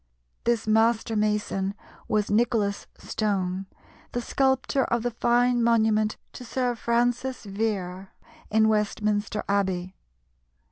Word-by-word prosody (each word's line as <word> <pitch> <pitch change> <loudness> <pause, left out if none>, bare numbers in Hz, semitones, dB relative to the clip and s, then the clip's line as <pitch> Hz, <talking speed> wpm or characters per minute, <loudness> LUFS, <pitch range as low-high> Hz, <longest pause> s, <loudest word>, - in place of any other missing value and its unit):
This 235 -1 +1
master 225 +1 +2
mason 210 -2 0 0.3
was 210 -1 0
Nicholas 215 -2 +1
Stone, 190 -3 -2 0.5
the 245 - 0
sculptor 265 +2 +1
of 235 -1 0
the 245 - 0
fine 240 +1 +2
monument 220 -2 +2 0.2
to - - -9
Sir 250 0 -1
Francis 245 +2 0
Vere 195 -3 -3 0.4
in 220 0 +4
Westminster 210 0 0
Abbey. 190 -2 -1
220 Hz, 105 wpm, -26 LUFS, 200-235 Hz, 0.5 s, in